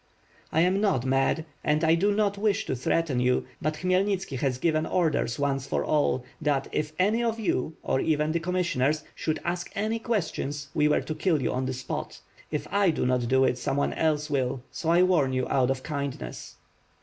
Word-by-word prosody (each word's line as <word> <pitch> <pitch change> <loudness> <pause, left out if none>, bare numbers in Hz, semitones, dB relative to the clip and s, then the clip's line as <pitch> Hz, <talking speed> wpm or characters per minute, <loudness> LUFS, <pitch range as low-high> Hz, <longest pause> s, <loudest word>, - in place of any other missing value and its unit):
^T 160 - +3
am 185 +3 +2
not 190 - +1
mad, 135 +4 +1 0.2
and 150 +2 +1
I 160 0 +5
do 195 +5 +3
not 205 -1 +1
wish 205 0 0
to - - -2
threaten 135 +1 0
you; 125 0 +2 0.2
but 155 +1 -1
Khmyelnitski 185 -3 0
has 130 -2 0
given 155 +3 +1
orders 155 -9 +1
once 140 -1 -1
for - - -1
all, 140 -4 +1 0.2
that 145 -3 +1
if 150 0 -2
any 215 +6 +2
of 230 -1 -1
you, 160 - -1
or - - +1
even 150 0 +1
the 170 - 0
commissioners, 160 -5 0
should 155 -1 -2
ask 175 0 -2
any 215 +3 -1
questions, 155 - -2
we 150 0 +3
were 150 - +3
to 155 - -4
kill 155 0 +1
you 130 - -1
on 130 +1 -1
the 130 - -2
spot. 130 - -5 0.3
If 150 - -3
I 200 -2 +4
do 155 - 0
not 125 -1 +1
do 130 +2 +4
it, 125 -1 +1
some 135 - -1
one 140 - +1
else 150 -2 +1
will, 130 -3 -1
so 165 -4 -3
I 175 +2 +5
warn 160 -8 +3
you 130 -1 0
out 130 -2 +2
of 130 -1 -1
kindness." 140 - -5
155 Hz, 205 wpm, -27 LUFS, 135-180 Hz, 0.3 s, I